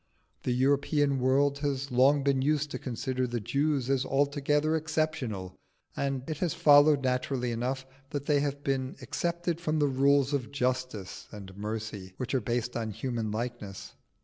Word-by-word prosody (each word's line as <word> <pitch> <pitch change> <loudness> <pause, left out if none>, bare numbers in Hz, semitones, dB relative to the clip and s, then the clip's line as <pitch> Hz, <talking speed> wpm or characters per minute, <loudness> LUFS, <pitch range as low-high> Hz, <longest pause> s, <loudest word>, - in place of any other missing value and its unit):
The 125 - -1
European 140 +2 +2
world 140 +2 +2
has 140 -1 -2
long 135 +3 +4
been 135 -1 +2
used 150 +1 +1
to - - -4
consider 130 0 -2
the 120 0 -2
Jews 140 +3 0
as 135 -1 +2
altogether 145 +3 +1
exceptional, 155 - -2 0.4
and 135 -2 -2
it 155 -2 -4
has 175 -4 0
followed 145 -1 +6
naturally 125 -1 0
enough 130 +3 -2 0.2
that 145 0 -4
they 145 -1 +3
have 140 0 -2
been 130 -1 -1
excepted 170 +5 -2
from 155 -2 0
the 150 - +3
rules 140 +1 +3
of 135 -3 -2
justice 125 -7 -2
and 100 -3 -9
mercy, 105 -2 -5
which 130 - -4
are 130 - +2
based 120 +2 -2
on 115 -2 -2
human 115 +1 -3
likeness. 105 -3 -5
135 Hz, 160 wpm, -29 LUFS, 125-145 Hz, 0.4 s, followed